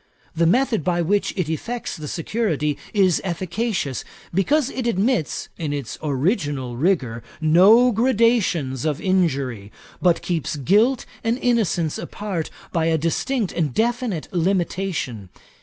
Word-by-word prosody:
The 165 0 +3
method 240 - +2
by 175 +1 +1
which 200 +5 +1
it 180 -5 0
effects 230 +10 -4
the 155 -1 -7
security 160 -4 -1 0.2
is 190 -5 +3
efficacious, 185 - -2 0.3
because 270 - +2
it 255 -2 -3
admits, 225 - 0
in 155 -3 -2
its 140 -6 -5
original 145 - -1
rigour, 130 -6 0 0.2
no 190 +10 +6
gradations 220 - +2
of 150 -2 -1
injury; 140 - 0 0.3
but 175 -2 +3
keeps 165 -4 -2
guilt 210 - +2 0.2
and 230 +1 +1
innocence 220 - 0
apart, 195 -6 -4 0.2
by 165 -2 +1
a 165 -1 +2
distinct 200 - -1
and 155 -7 -1
definite 235 -7 0
limitation. 175 - -1
175 Hz, 125 wpm, -22 LUFS, 150-225 Hz, 0.3 s, no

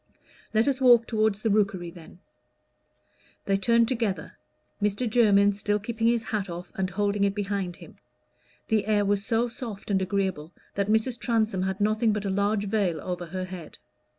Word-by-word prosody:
"Let 225 +2 +2
us 275 -1 0
walk 240 -3 +6
toward 220 -2 +1
the 215 +2 -1
Rookery, 200 -4 +1
then." 170 -1 -14 1.3
They 195 - +2
turned 230 +3 +3
together, 230 -6 -2 0.5
Mr. 210 +4 0
Jermyn 205 -3 +4
still 205 +1 0
keeping 225 +2 -2
his 235 -1 +2
hat 215 -4 -3
off 175 +1 -7
and 190 -1 -2
holding 205 +1 0
it 200 0 +1
behind 200 -3 -2
him; 170 - -14 0.7
the 215 -2 +1
air 205 -1 +2
was 200 0 +1
so 230 +2 +1
soft 230 -5 -7
and 190 -1 +2
agreeable 185 -4 -2 0.2
that 200 0 -1
Mrs. 220 +3 +1
Transome 220 -5 0
had 190 +1 -2
nothing 215 +2 +2
but 210 -1 -3
a 195 - -1
large 200 +1 +1
veil 195 -6 0
over 180 +1 -5
her 185 +2 -4
head. 180 -4 -9
205 Hz, 175 wpm, -26 LUFS, 190-220 Hz, 1.3 s, walk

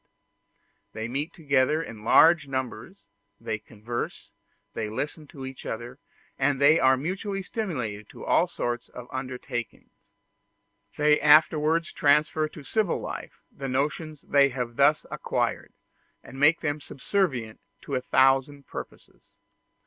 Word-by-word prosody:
There 110 - -5
they - - -2
meet 140 +6 -3
together 150 0 +1
in 110 -8 -10
large 165 +6 +6
numbers, 130 -2 -5 0.4
they 110 - -3
converse, 110 +2 -6 0.4
they 110 -2 -3
listen 150 +7 -4
to 135 -1 -9
each 130 0 -8
other, 120 +4 -6 0.4
and 135 0 +2
they 150 +3 +6
are 130 0 +5
mutually 195 - -3
stimulated 125 - -4
to - - -10
all - - +3
sorts 120 0 -3
of 125 -1 -10
undertakings. 130 -2 -5 1.1
They 150 0 +4
afterwards 155 +2 +4
transfer 150 +2 +3
to 150 -1 -12
civil 215 +5 0
life - - -7
the 135 - -6
notions 150 +3 -2
they 140 -1 +4
have 125 -2 -4
thus 145 +3 +4
acquired, - - -2 0.5
and 135 - -11
make 150 +4 +5
them 145 0 -2
subservient 135 - -2 0.2
to 140 - -8
a 130 - +1
thousand 135 +2 +2
purposes. - - -10
140 Hz, 135 wpm, -26 LUFS, 125-155 Hz, 1.1 s, large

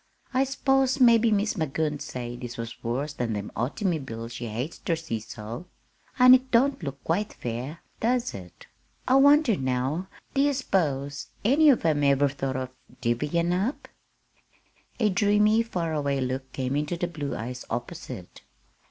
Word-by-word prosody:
"I 260 +1 +3
s'pose 270 0 +1
mebbe 235 -2 +6
Mis' 210 +1 +1
Magoon'd 155 -3 -1
say 120 -1 -5
this 120 -1 -7
was 115 0 -7
worse 135 +6 -2
than 120 -5 -2
them 105 -1 -4
autymobiles 130 - -2
she 120 0 -5
hates 120 +9 -4
ter 165 - 0
see 160 -9 -4
so; 110 +7 -8 0.5
an' 250 -1 +9
it 260 0 +4
don't 265 +1 +3
look 140 -4 -6
quite 205 +6 -1
fair; 125 +7 -5 0.2
does 240 +1 +1
it? 90 -3 -11 0.4
I 260 - +5
wonder 285 -4 +6
now, 130 +6 -1 0.3
do 275 - +2
ye 285 0 +3
s'pose 145 - -1 0.2
any 285 +7 +4
one 285 - +9
of 235 - -4
'em 150 -3 +2
ever 140 0 +4
thought 135 -1 -3
of 130 -1 -3 0.3
divvyin' 150 +8 0
up?" 200 +10 -1 1.1
A 215 -3 +3
dreamy, 210 +3 +4
far 175 -8 -2
away 140 -2 0
look 130 0 -3
came 130 0 -2
into 150 +4 -1
the 175 - -1
blue 150 -5 -4
eyes 125 +2 -5
opposite. 120 +1 -6
150 Hz, 160 wpm, -26 LUFS, -, 1.1 s, an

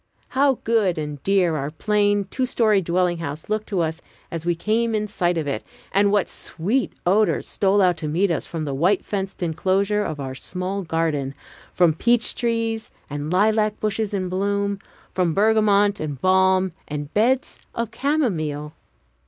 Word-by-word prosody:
How 270 -1 +2
good 215 -7 +2
and 150 -2 -5
dear 185 -3 +2
our 140 -1 -2
plain, 205 +4 +1
two 260 -1 0
story 215 -5 +3
dwelling 175 0 0
house 155 +1 -6
looked 215 0 -1
to 195 -4 0
us 160 +1 -2 0.3
as 165 0 -5
we 175 - +2
came 225 +5 0
in 210 0 0
sight 175 -4 0
of 160 - -1
it, 140 -6 -3 0.3
and 200 +1 +3
what 205 -2 +2
sweet 215 +11 -2
odors 205 +4 +2
stole 200 0 +2
out 180 -2 +3
to 155 - -4
meet 175 +5 +1
us 165 - -2
from 160 -2 -4
the 140 - -3
white 180 +8 +2
fenced 195 -2 -3
inclosure 195 +5 +1
of 155 -6 -4
our 135 -1 -4
small 185 +8 -4
garden, 160 -5 -1 0.4
from 175 -3 +3
peach 235 +7 +2
trees 230 -1 -1 0.2
and 145 +2 -4
lilac 215 +2 +2
bushes 215 0 -1
in 190 -3 -2
bloom, 200 +2 -1 0.3
from 175 -4 +1
bergamot 205 -1 +3
and 145 -4 -4
balm 190 +1 +3 0.2
and 145 0 -5
beds 245 +5 +1 0.2
of 230 -1 -2
camomile! 170 - -1
190 Hz, 170 wpm, -23 LUFS, 165-215 Hz, 0.4 s, story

